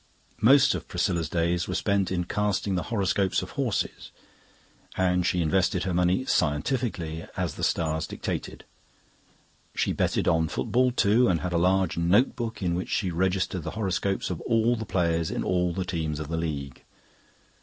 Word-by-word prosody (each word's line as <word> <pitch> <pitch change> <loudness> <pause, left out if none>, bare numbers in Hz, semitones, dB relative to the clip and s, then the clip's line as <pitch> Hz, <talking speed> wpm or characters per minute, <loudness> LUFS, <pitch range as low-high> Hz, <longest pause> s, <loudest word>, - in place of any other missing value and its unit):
Most 135 +5 +6
of - - -5
Priscilla's 85 -3 -1
days 85 +1 0
were 90 - -3
spent 100 -2 +1
in 90 -1 0
casting 105 +1 -1
the 90 - 0
horoscopes 100 -3 +1
of - - -8
horses, - - -2 0.9
and 90 -1 +2
she 90 -1 +1
invested 95 +2 +1
her 95 - -2
money 90 +8 +2
scientifically, 85 - -1
as - - -1
the - - -7
stars 80 -1 0
dictated. - - -5 1.1
She - - 0
betted - - 0
on 80 -1 +3
football 125 - +1
too, 120 +1 +3
and 85 -6 +1
had 90 -1 -3
a 85 - +2
large 95 0 +2
notebook 110 +4 +1
in 85 -2 +1
which 90 +1 -3
she 95 -3 0
registered 95 +1 0
the - - -5
horoscopes 95 -2 -1
of 90 - -4
all 115 0 +2
the 110 -2 -6
players 85 -3 0
in - - -2
all 90 -1 +1
the 95 +2 -3
teams 80 -4 -3
of 75 -1 -6
the 80 - -2
League. 70 -5 -4
90 Hz, 165 wpm, -26 LUFS, 85-100 Hz, 1.1 s, Most